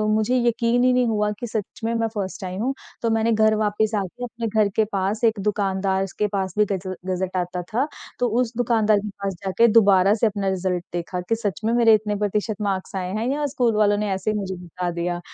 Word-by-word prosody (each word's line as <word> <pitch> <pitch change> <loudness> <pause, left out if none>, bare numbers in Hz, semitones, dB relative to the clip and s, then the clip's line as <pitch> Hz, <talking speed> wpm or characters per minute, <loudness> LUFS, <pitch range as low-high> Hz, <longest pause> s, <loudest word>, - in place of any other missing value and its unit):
मुझे 220 +4 +1
यकीन 235 +1 +2
ही 255 - +5
नहीं 250 -1 +3
हुआ 210 -2 +1
कि 240 - -4
सच 215 -3 -5
में, 230 +1 0
मैं 230 0 +1
फर्स्ट 195 -1 -4
आई 185 0 -4
हूँ। 255 +6 0 0.3
तो 230 - +1
मैंने 225 +1 +2
घर 220 0 +4
वापस 215 0 +1
आके 195 +6 -6
अपने 230 -1 -4
घर 215 -1 +2
के 220 - +3
पास 200 +4 -1
एक 225 -2 +3
दुकानदार 195 -2 0
स 190 - -10
के 210 - +2
पास 190 -2 -1
भी 210 - +5
गज़ 190 -1 -3 0.2
गज़ट 185 0 -2
आता 180 0 -2
था। 265 +6 +1 0.3
तो 245 - +2
उस 240 -1 -2
दुकानदार 220 -3 +3
के 210 - -5
पास 195 - -1
जाके 230 +5 +4
दोबारा 195 -1 +5
से 225 +1 +2
अपना 200 -2 -2
रिज़ल्ट 185 -2 -1
देखा, 175 +1 -3
कि 225 +6 -1
सच 210 -4 -3
में 230 - +2
मेरे 230 -2 +5
इतने 210 -1 +1
प्रतिशत 210 +1 -1
मार्क्स 195 -2 -2
आए 185 -1 -3
हैं, 220 +3 -1
या 295 +1 -1
स्कूल 235 -3 +2
वालों 205 -1 +3
ने 210 -1 -1
ऐसे 190 +3 -1
ही 210 - -1
मुझे 190 -2 -3
बता 175 +1 -4
दिया। 175 +1 -2
210 Hz, 235 wpm, -23 LUFS, 190-225 Hz, 0.3 s, ही